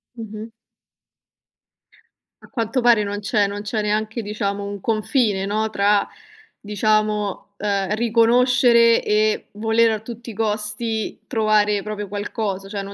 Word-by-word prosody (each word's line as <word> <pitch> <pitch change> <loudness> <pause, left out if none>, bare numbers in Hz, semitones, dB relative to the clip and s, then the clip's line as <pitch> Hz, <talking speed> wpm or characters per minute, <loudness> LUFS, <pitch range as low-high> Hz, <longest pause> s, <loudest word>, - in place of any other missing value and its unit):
Mh-mh. 220 -1 -7 2.0
A - - -15
quanto 235 +2 -1
pare 235 -3 +5
non 205 0 -3
c'è 205 -1 +1
non 205 +1 -5
c'è 215 +1 -2
neanche, 215 +2 -1
diciamo, 205 -1 -3
un 200 0 -5
confine 215 -2 0
no, 215 +1 -1
tra 205 0 +2 0.5
diciamo, 210 -1 -1
ehm, 200 -1 -1
riconoscere 235 +1 +4
e 215 +1 +1
volere 225 +1 +2
a 215 - -2
tutti 235 +1 -9
i - - -7
costi 215 +1 -2
trovare 210 -2 +2
proprio 210 0 -5
qualcosa, 200 -1 -4
cioè 200 -1 -4
non 200 0 -8
215 Hz, 130 wpm, -21 LUFS, 205-225 Hz, 2.0 s, pare